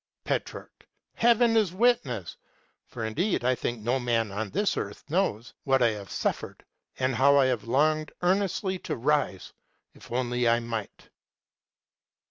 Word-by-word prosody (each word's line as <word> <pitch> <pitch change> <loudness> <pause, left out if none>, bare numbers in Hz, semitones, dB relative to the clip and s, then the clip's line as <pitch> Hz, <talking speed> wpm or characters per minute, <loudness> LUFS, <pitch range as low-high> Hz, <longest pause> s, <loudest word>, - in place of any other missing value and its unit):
Petrarch. - - -5 0.3
Heaven 235 0 +3
is 210 -6 +2
witness 185 - +1 0.5
(for 115 -2 -5
indeed 150 - -1
I 130 - +4
think 120 -1 -3
no 125 +4 +1
man 115 -4 0
on 105 +1 -3
this 205 - 0
earth - - -5
knows) 155 - -1
what 135 -2 +3
I 120 - +5
have 105 -3 -6
suffered, - - -3 0.3
and 130 0 0
how 140 +4 +5
I 135 - +5
have 125 -4 -1
longed 155 +5 +1
earnestly 190 0 0
to - - -4
rise, 135 -7 -1 0.4
if - - -16
only 120 -1 0
I 115 0 +3
might. 115 -3 -6
130 Hz, 145 wpm, -27 LUFS, 115-180 Hz, 0.5 s, I